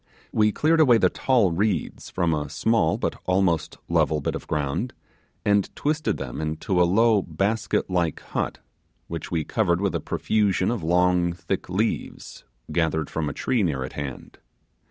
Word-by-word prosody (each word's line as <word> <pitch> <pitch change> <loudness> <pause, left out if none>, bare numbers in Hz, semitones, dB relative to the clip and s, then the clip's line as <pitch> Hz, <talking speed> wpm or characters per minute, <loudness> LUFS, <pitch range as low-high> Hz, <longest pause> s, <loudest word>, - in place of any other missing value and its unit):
We 105 -1 +3
cleared 160 +8 +2
away 130 -7 +6
the - - +3
tall 120 -9 +2
reeds 95 -1 -1
from 85 -2 0
the 75 -2 -1
small 80 +4 +1
but - - -3
almost 90 -4 +1
level 75 - +2
bit 70 - -2
of - - -6
ground, 75 - -2 0.5
and 100 -1 +3
twisted 150 +1 0
them 70 +2 -5
into 80 +4 0
a - - +6
low 110 +2 +4
basket 100 +5 -1
like 85 -4 0
hut, - - -3 0.5
which 85 -1 -5
we 80 -2 -1
covered 85 -2 +1
with 100 -1 0
a - - -1
profusion 100 -2 +1
of 120 -5 -2
long 90 +1 +2
thick 85 +1 -4
leaves, 105 +5 -3 0.3
gathered 80 -2 0
from 80 -2 -1
a - - -5
tree 125 -4 0
near 75 -8 0
at 65 - -7
hand. 70 -4 -7
90 Hz, 165 wpm, -24 LUFS, 80-110 Hz, 0.5 s, away